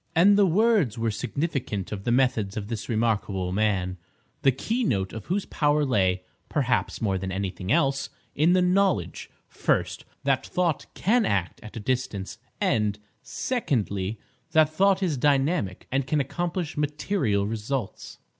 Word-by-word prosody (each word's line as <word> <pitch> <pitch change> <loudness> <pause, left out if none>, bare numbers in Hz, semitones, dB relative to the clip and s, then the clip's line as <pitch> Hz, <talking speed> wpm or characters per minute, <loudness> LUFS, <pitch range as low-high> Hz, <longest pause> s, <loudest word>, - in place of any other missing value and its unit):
And 195 +5 +6
the 200 -1 +5
words 190 - +3
were 115 -1 0
significant 130 - -3
of 100 -2 -5
the 120 - +1
methods 120 -6 +1
of 105 -1 -4
this 115 0 -5
remarkable 105 -5 0
man, 95 -3 0 0.4
the 135 - +5
keynote 130 - -1
of 110 - -7
whose 195 +3 0
power 150 0 +1
lay, 95 -7 +1 0.3
perhaps, 130 -5 0
more 95 -3 +1
than 95 0 -4
anything 95 0 -3
else, 135 -4 +2 0.2
in 160 +5 +3
the 185 -1 +4
knowledge, 180 - +1 0.2
first, - - -1 0.2
that 135 -1 +2
thought 175 -5 0
can 230 +4 +2
act 95 - -1
at 110 +1 -10
a - - -3
distance, 110 -4 -3 0.2
and, 105 -2 +1 0.2
secondly, 110 - -2 0.4
that 155 -1 +5
thought 195 +3 +3
is 160 -6 0
dynamic 140 - +1
and 135 0 0
can 150 +1 +1
accomplish 175 +3 -2
material 150 - 0
results. 110 +2 -4
130 Hz, 145 wpm, -26 LUFS, 100-165 Hz, 0.4 s, And